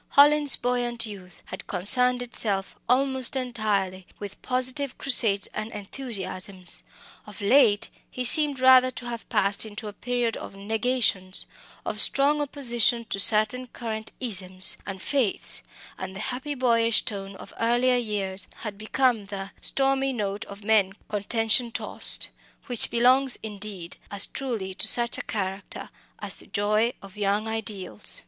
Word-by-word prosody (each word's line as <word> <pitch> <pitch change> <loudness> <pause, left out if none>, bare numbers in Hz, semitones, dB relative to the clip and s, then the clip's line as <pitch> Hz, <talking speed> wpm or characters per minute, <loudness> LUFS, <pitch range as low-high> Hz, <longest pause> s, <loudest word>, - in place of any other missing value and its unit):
Hallin's 290 0 +7
buoyant 240 -1 -1
youth 190 -4 -11
had 185 - -9
concerned 245 +7 +2
itself 205 -5 -1
almost 265 0 +1
entirely 210 -7 -2
with 205 -1 -9
positive 255 +2 0
crusades 220 -7 +3
and 215 +1 -5
enthusiasms. 195 -5 0 0.5
Of 210 0 -11
late 205 -1 +4 0.2
he 255 - -4
seemed 290 +1 +4
rather 255 0 +6
to 250 -1 -8
have 235 -1 -7
passed 200 +1 +1
into 215 0 -7
a 205 - -7
period 245 0 -2
of - - -9
negations, 210 -2 -1 0.4
of - - -3
strong 290 +2 +1
opposition 240 -5 +1
to 195 - -2
certain 215 +5 +4
current 220 -2 -6
isms 190 -6 +2
and 195 -1 -5
faiths; 250 -1 -1 0.4
and 190 - -6
the - - -7
happy 265 +4 -4
boyish 230 -3 +2
tone 195 -2 -5
of - - -12
earlier 240 +2 +2
years 200 -5 -3
had 210 -3 -6
become 230 0 +1
the 195 -1 -7
"stormy 270 0 +2
note 205 -2 -3
of 200 +1 -11
men 205 -3 +3 0.2
contention 225 +3 +1
tost," - - 0 0.4
which 245 -4 +4
belongs, 255 +2 +3
indeed, 205 -5 -6
as 200 0 0
truly 230 -8 -4
to 185 - 0
such 235 -1 +4
a - - -2
character 195 -1 -4 0.3
as - - -7
the - - -9
joy 215 +3 +1
of 195 +1 -13
young 205 +1 0
ideals. 210 - -1
220 Hz, 140 wpm, -25 LUFS, 200-250 Hz, 0.5 s, Hallin's